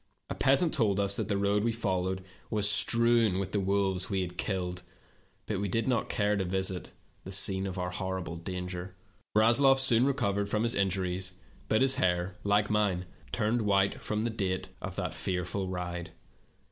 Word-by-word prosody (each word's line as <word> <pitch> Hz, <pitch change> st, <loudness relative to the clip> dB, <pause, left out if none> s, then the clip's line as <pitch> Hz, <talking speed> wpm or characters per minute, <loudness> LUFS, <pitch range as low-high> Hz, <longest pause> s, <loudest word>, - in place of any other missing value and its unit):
A -, -, 0 dB
peasant 135 Hz, +5 st, +3 dB
told 105 Hz, -7 st, +1 dB
us 100 Hz, 0 st, +2 dB
that -, -, -2 dB
the 100 Hz, -, +1 dB
road 100 Hz, +1 st, +1 dB
we 115 Hz, -, +1 dB
followed 95 Hz, -4 st, -2 dB, 0.3 s
was 105 Hz, -2 st, +2 dB
strewn 115 Hz, 0 st, +5 dB
with 95 Hz, -1 st, -3 dB
the 105 Hz, -, 0 dB
wolves 95 Hz, -1 st, 0 dB
we 95 Hz, -2 st, 0 dB
had 90 Hz, -1 st, -5 dB
killed, 90 Hz, -2 st, -2 dB, 0.6 s
but 105 Hz, -3 st, -2 dB
we 100 Hz, -, -1 dB
did 115 Hz, +5 st, -1 dB
not 125 Hz, -4 st, 0 dB
care 105 Hz, -2 st, +1 dB
to 100 Hz, -, 0 dB
visit 95 Hz, 0 st, -2 dB, 0.3 s
the 95 Hz, -, -8 dB
scene 95 Hz, 0 st, +1 dB
of 95 Hz, 0 st, -5 dB
our 90 Hz, 0 st, -2 dB
terrible 95 Hz, -3 st, -4 dB
danger. 90 Hz, +1 st, -6 dB, 0.4 s
Rasloff 120 Hz, +5 st, +5 dB
soon 130 Hz, -1 st, +4 dB
recovered 100 Hz, -7 st, 0 dB
from 105 Hz, +1 st, 0 dB
his 115 Hz, 0 st, +1 dB
injuries, 95 Hz, -1 st, 0 dB, 0.3 s
but 110 Hz, +4 st, +3 dB
his 135 Hz, -1 st, +2 dB
hair, 90 Hz, 0 st, +1 dB
like 105 Hz, +1 st, +2 dB
mine, 105 Hz, -4 st, 0 dB, 0.3 s
turned 115 Hz, +1 st, 0 dB
white 100 Hz, -1 st, +1 dB
from 105 Hz, 0 st, -2 dB
the 115 Hz, -, -1 dB
date 95 Hz, -4 st, -2 dB
of -, -, -6 dB
that -, -, -3 dB
fearful 95 Hz, +1 st, -3 dB
ride. 90 Hz, -1 st, -4 dB
100 Hz, 180 wpm, -29 LUFS, 95-110 Hz, 0.6 s, strewn